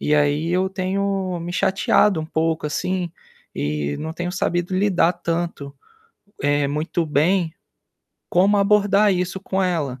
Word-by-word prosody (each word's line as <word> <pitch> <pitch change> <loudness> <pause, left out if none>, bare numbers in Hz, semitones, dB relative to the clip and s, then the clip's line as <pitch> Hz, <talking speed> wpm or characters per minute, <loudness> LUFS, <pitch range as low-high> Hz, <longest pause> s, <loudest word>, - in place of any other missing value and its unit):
E, 150 - +1
aí, 145 +2 +2
eu 185 +2 +1
tenho 190 -1 -1
me 175 +1 -5
chateado 195 0 +2
um - - -4
pouco, 160 -1 -1
assim, 175 +3 -2 0.4
e 75 -1 -2
não 160 +1 -4
tenho 175 +1 -4
sabido 175 0 -1
lidar 185 -3 +3
tanto, 165 -5 -3 0.7
eh, 145 0 +2
muito 155 +3 -1
bem, 160 +3 +1 0.8
como 195 +4 +4
abordar 205 0 +4
isso 180 +1 -2
com 195 0 -1
ela, 150 -8 -1
175 Hz, 140 wpm, -22 LUFS, 155-190 Hz, 0.8 s, como